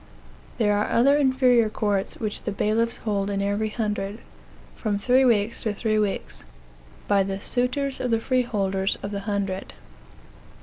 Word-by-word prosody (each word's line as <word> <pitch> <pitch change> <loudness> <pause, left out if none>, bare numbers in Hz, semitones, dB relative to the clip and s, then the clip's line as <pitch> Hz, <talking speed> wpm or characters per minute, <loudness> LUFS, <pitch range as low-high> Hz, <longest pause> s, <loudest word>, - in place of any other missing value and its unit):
There 210 -2 +2
are 205 - 0
other 275 +5 +4
inferior 260 -5 +3
courts 205 -2 -1
which 215 -2 -3
the - - -3
bailiffs 220 +3 0
hold 200 -2 0
in 200 -1 -1
every 205 +2 0
hundred, 210 -2 -3 0.6
from 210 -3 -1
three 250 +6 +3
weeks 225 -3 +2
to 215 -2 -2
three 215 0 0
weeks, 205 -2 -2 0.6
by 200 -1 +4
the 195 0 -2
suitors 255 +5 0
of 250 - -1
the 225 -1 +2
freeholders 205 -6 0
of 200 - -4
the 200 - -3
hundred. 195 -2 -3
215 Hz, 150 wpm, -24 LUFS, 200-240 Hz, 0.6 s, other